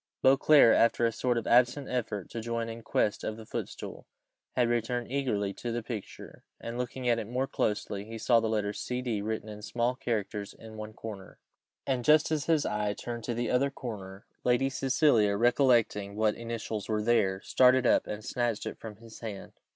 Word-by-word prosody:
Beauclerc, 135 -1 +6
after 115 +1 +3
a 115 - +2
sort 125 +1 0
of 115 - -2
absent 125 +3 +3
effort 110 -6 -3
to 115 - -4
join 115 0 -3
in 115 +1 -7
quest 105 -2 0
of 110 - -3
the 110 - -10
footstool, - - -6 0.5
had 120 -2 +3
returned 120 +1 -1
eagerly 110 -8 -1
to 120 - -5
the 120 0 -3
picture, 110 -4 -8 0.2
and 115 - -6
looking 125 +1 -3
at 120 -1 +3
it 105 - -5
more 125 +3 -1
closely, 105 -5 -2
he 115 +2 -8
saw 115 +1 +4
the 110 -1 -1
letters 105 -2 -1
C.D. 125 -4 -2
written 110 +1 -3
in 105 -1 -8
small 120 +3 0
characters 105 -4 -3
in 110 -1 -12
one 110 0 -7
corner; 105 -4 -9 0.5
and, 130 -2 0
just 150 +3 +4
as 155 -2 0
his 160 -3 +2
eye 105 -1 -1
turned 120 +1 -6
to 120 - -2
the 120 +1 -1
other 135 +3 +2
corner, 105 -7 -8 0.2
Lady 130 +2 +2
Cecilia, 130 -6 +3
recollecting 115 -4 +2
what 110 0 +2
initials 115 -2 -5
were 105 -1 0
there, 100 -5 +2
started 130 0 +4
up - - +3
and 105 +1 -6
snatched 120 -4 -1
it - - -6
from 110 -2 -8
his 115 +1 -13
hand. 105 -4 -7
115 Hz, 190 wpm, -29 LUFS, 105-125 Hz, 0.5 s, Beauclerc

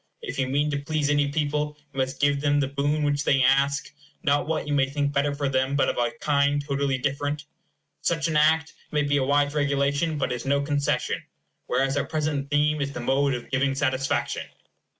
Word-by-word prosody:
If 455 - -5
you 135 - +1
mean 145 +3 +1
to 145 - -1
please 145 0 -1
any 145 -1 +2
people 150 0 -1 0.2
you 135 - -5
must 130 +1 -1
give 145 -1 +2
them 145 0 +2
the 140 - +1
boon 145 +2 0
which 145 0 +1
they 135 -3 +3
ask; 135 +2 +2 0.3
not 145 0 +2
what 160 -1 -1
you 145 - -2
may 135 -2 +2
think 145 0 -1
better 145 +1 +1
for 140 -1 -1
them, 130 +1 0
but 140 - +2
of - - -3
a 120 -1 +2
kind 145 -1 +2
totally 140 -1 0
different. 145 +3 -2 0.6
Such 165 -2 0
an 160 - -2
act 160 +2 +3 0.2
may 150 -1 +1
be 145 0 +1
a 135 - +1
wise 145 +1 +2
regulation, 145 +2 +1
but 140 - -1
it - - 0
is - - -8
no 140 +1 +3
concession; 145 -1 0 0.5
whereas 135 +2 +1
our - - 0
present 150 -3 -2
theme 150 +1 +2
is 140 0 -2
the - - -5
mode 135 +2 +1
of 120 - -8
giving 135 +1 +1
satisfaction. 135 -1 -1
145 Hz, 210 wpm, -25 LUFS, 135-150 Hz, 0.6 s, they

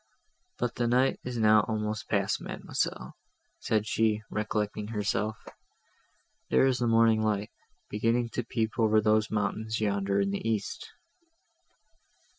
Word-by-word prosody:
"But 120 -1 -1
the 120 - +1
night 125 +3 +2
is 125 -1 -4
now 110 -1 +5
almost 110 -1 -3
past, 100 -2 0
Mademoiselle," - - -3 0.5
said 105 -1 0
she, 110 -1 +1
recollecting 105 -1 -2
herself; 105 0 -1 1.1
"there - - +4
is 130 -1 +2
the 120 - +1
morning 115 -1 +4
light, 105 0 -1 0.4
beginning 115 +3 0
to 120 - -3
peep 110 0 -2
over 110 -1 +4
those 110 0 +2
mountains 110 +1 -2
yonder 100 -2 0
in 100 0 +1
the 100 - -3
east." 110 -2 -2
110 Hz, 130 wpm, -29 LUFS, 105-115 Hz, 1.1 s, now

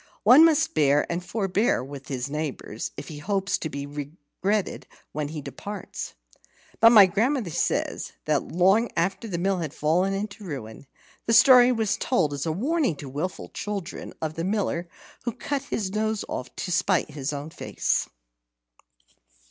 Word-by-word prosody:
One 250 +9 +8
must 325 -3 +4
bear 145 -1 +3
and 175 +1 -2
forbear 195 - 0
with 135 0 -9
his 130 -1 -3
neighbours, 145 -7 -4
if 140 - -7
he 150 -2 -7
hopes 195 +4 -1
to 160 - -3
be 140 -1 -5
regretted 150 +8 -3 0.2
when 150 -1 -3
he 150 -1 -6
departs. 190 - -7 0.6
But 230 - +8
my 210 -4 +9
grandmother 220 - 0
says - - -1
that 150 -2 +2
long 195 +6 +3
after 190 +7 0
the 180 -5 -3
mill 190 +1 0
had 155 -4 -4
fallen 180 +6 +1
into 205 +1 -5
ruin, 135 - -7 0.4
the 230 - +3
story 250 +1 +8
was 220 -4 0
told 155 - +1
as 145 +3 -3
a - - +1
warning 265 - 0
to 140 0 -9
wilful 150 +8 -4
children 205 -4 -5
of 155 -1 -2
the 165 - -4
Miller 185 -3 -1 0.4
who 240 - -1
cut 285 +4 -3
off 275 - -17
his 200 -4 -2
nose 215 0 -1 0.3
to 180 - -4
spite 185 -2 +1
his 145 -1 -3
own 145 +2 -6
face. - - -1
180 Hz, 165 wpm, -25 LUFS, 150-215 Hz, 0.6 s, my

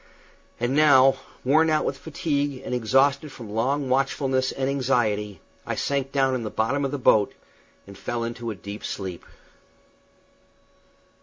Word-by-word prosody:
And 120 +3 0
now, 135 -3 +6 0.3
worn 155 +5 +4
out 155 -1 +2
with - - -1
fatigue 145 -3 -2
and - - -4
exhausted 135 +5 +2
from 115 -5 -10
long 135 +6 0
watchfulness 130 0 +1
and 135 -1 -2
anxiety, 115 -7 0 0.2
I - - -3
sank 140 -1 -1
down 135 -2 +2
in 130 - -1
the 110 - -4
bottom 125 +8 0
of 135 - 0
the 145 - -3
boat 110 -5 +3 0.5
and 100 - -12
fell 120 +4 -3
into 115 0 -4
a 110 - -4
deep 100 +2 -8
sleep. 95 -3 -5
130 Hz, 150 wpm, -24 LUFS, 115-140 Hz, 0.5 s, now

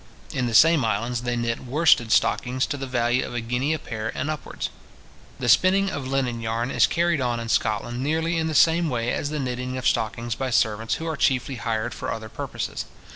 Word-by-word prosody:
In 125 -2 0
the 115 - -1
same 160 +3 +6
islands, 115 +2 -1
they 120 0 -2
knit 120 0 -2
worsted 130 -3 +3
stockings 125 +4 +2
to - - -3
the 135 -1 -5
value 120 0 +1
of 120 - -6
a - - 0
guinea 125 +5 -1
a 160 - +1
pair 110 -5 -5
and 140 +4 -1
upwards. 155 - -5 0.7
The 125 - -3
spinning 190 - +4
of 135 -2 -4
linen 130 -3 -1
yarn 115 +3 -2
is - - +4
carried 170 -3 +1
on 120 -2 0
in 115 0 -5
Scotland 115 +3 0
nearly 160 +4 0
in 160 0 0
the 160 - -2
same 165 +3 +4
way 120 -2 -1
as 145 - -2
the 155 - -3
knitting 125 -1 -3
of 130 - -1
stockings, 115 0 0
by 130 +4 -3
servants, 110 -2 +1
who 165 - -6
are 160 -1 -2
chiefly 135 -1 +1
hired 115 +1 -2
for - - -4
other 110 -1 -5
purposes. - - -5
125 Hz, 215 wpm, -24 LUFS, 115-145 Hz, 0.7 s, same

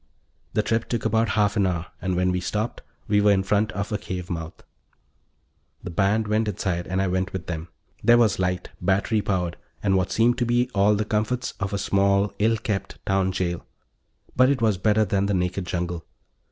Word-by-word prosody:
The 110 - +2
trip 115 +1 -1
took 120 -3 -2
about 110 0 +2
half 105 -1 +3
an 100 -2 +3
hour, 85 -2 -2 0.2
and 95 0 -1
when 90 +1 +2
we 90 - 0
stopped 105 +5 -3 0.3
we 105 0 +3
were 105 0 +5
in 95 -1 +3
front 105 +3 +1
of 100 +2 -3
a 105 - -1
cave 90 -1 -5
mouth. 80 -1 -6 1.2
The 90 - -5
band 100 +5 +1
went 110 +1 +1
inside 90 -3 -2
and 95 +1 -1
I 95 - +2
went 95 +1 -1
with 95 -2 -4
them. 80 -1 -5 0.4
There 120 0 +6
was 110 -5 +3
light, 90 -1 -1
battery 100 +4 +1
powered, 90 -4 -1 0.3
and 95 -2 +3
what 95 0 +1
seemed 120 +2 +3
to 120 - +2
be 120 +1 +1
all 100 +1 +4
the 105 +1 -1
comforts 110 +4 -1
of 100 0 -2
a 100 - -1
small, 100 +1 +2
ill 110 +2 +3
kept 105 -2 -3
town 95 -1 +1
jail. 85 -2 -2 0.7
But 130 +1 +5
it 140 -2 +1
was 110 -5 +2
better 110 +2 +3
than 100 0 0
the 100 - +1
naked 90 0 -1
jungle. 85 -1 -3
100 Hz, 205 wpm, -24 LUFS, 90-110 Hz, 1.2 s, There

